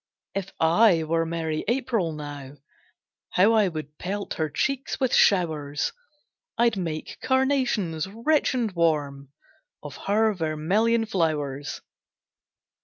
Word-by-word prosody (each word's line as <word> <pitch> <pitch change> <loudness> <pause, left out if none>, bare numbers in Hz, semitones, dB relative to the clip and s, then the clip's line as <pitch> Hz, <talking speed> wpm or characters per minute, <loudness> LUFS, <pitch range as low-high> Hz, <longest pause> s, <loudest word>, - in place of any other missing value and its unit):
If 195 -1 -4
I 170 +1 +4
were 165 +1 0
merry 160 -2 -2
April 235 -7 0
now, 145 -3 -7 0.8
How 200 +5 +5
I 215 -3 +4
would 155 -3 -7
pelt 200 +3 -4
her 155 -1 -2
cheeks 270 - -2
with 260 -2 +1
showers; 155 -6 +2 0.6
I'd 235 -1 +3
make 165 -5 -4
carnations, 255 - +1
rich 260 +8 +1
and 235 -4 0
warm, 145 -5 0 0.5
Of 145 -1 -8
her 215 +2 +3
vermilion 190 +8 +1
flowers. 150 -8 -2
175 Hz, 110 wpm, -25 LUFS, 155-225 Hz, 0.8 s, How